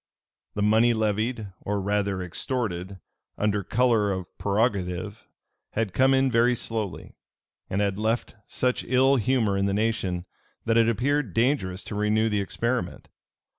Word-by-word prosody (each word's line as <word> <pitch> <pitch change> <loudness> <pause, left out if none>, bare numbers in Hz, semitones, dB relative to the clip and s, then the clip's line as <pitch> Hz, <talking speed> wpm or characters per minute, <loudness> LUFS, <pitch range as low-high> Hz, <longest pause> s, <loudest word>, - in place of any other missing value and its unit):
The 105 - 0
money 110 +3 +4
levied, 110 -1 -1
or 100 0 -2
rather 100 -1 -1
extorted, 95 - -3 0.4
under 105 -1 0
color 115 -1 +2
of 95 -2 -5
prerogative, 100 -1 -1 0.5
had 105 -4 -1
come 130 +5 +4
in 135 0 +2
very 120 +1 +3
slowly, 110 -4 -4 0.6
and 95 - 0
had 100 -1 0
left 110 +2 -1
such 125 0 0
ill 130 +2 +3
humor 120 -4 +1
in 100 0 +1
the 100 - 0
nation, 100 -5 -1 0.4
that 115 - +2
it 115 0 +4
appeared 130 -1 0
dangerous 115 -7 +1
to - - -7
renew 105 +2 +1
the 105 -1 0
experiment. 115 -1 -3
110 Hz, 140 wpm, -26 LUFS, 100-120 Hz, 0.6 s, money